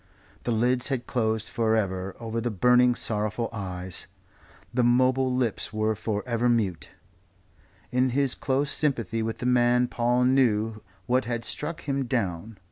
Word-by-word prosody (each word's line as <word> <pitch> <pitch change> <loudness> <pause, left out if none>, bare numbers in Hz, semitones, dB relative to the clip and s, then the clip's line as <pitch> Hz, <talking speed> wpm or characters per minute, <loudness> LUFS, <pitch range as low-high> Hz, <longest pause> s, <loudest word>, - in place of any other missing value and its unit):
The 120 - 0
lids 125 +2 +1
had 130 -4 -2
closed 110 -2 -1
for 110 -1 +1
ever 95 -3 -2
over 115 0 -3
the 120 - -1
burning, 125 +4 +4
sorrowful 110 +1 -2
eyes; 95 -3 -5 0.7
the 125 - +2
mobile 130 +2 +3
lips 125 -4 -1
were 110 0 0
for 105 0 -3
ever 120 0 +1
mute. 95 -11 0 1.0
In 125 +1 +2
his 135 +1 +1
close 140 +1 0
sympathy 115 -7 0
with 110 0 -3
the - - -5
man 125 0 +3
Paul 120 +1 +1
knew 115 -4 +2 0.2
what 125 +2 +1
had 115 -1 -3
struck 160 +2 -4
him 140 -2 -1
down. 110 -3 -2
120 Hz, 150 wpm, -26 LUFS, 110-125 Hz, 1.0 s, burning